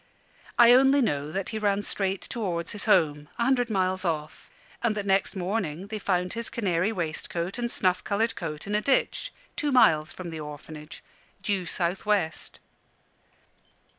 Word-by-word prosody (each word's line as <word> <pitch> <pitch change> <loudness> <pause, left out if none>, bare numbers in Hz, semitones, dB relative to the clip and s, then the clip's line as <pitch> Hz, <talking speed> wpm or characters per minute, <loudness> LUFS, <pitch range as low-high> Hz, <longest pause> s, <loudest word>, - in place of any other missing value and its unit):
I 235 0 +8
only 270 +2 +6
know 145 - 0
that 195 +2 -3
he 220 - -3
ran 205 -1 +1
straight 195 -2 -1
towards 180 -8 -3
his 210 - -4
home, 150 -8 +3
a 235 - +1
hundred 245 -1 +2
miles 185 -2 0
off, 155 -3 -3 0.3
and 220 -3 +1
that 205 - -2
next 195 0 +1
morning 185 -3 -2
they 215 -1 -4
found 180 -2 0
his 230 0 -2
canary 190 -2 0
waistcoat 170 +1 -3
and 240 0 -1
snuff 185 -5 +1
coloured 220 +3 0
coat 155 -3 -5
in 205 - -4
a 210 - +2
ditch, 280 - +1 0.2
two 295 -2 0
miles 155 - +5
from 175 -2 -7
the 160 - -6
Orphanage, 150 0 -9 0.4
due 195 -4 0
south 175 +2 -1
west. 200 -7 -1
195 Hz, 165 wpm, -27 LUFS, 170-220 Hz, 0.4 s, I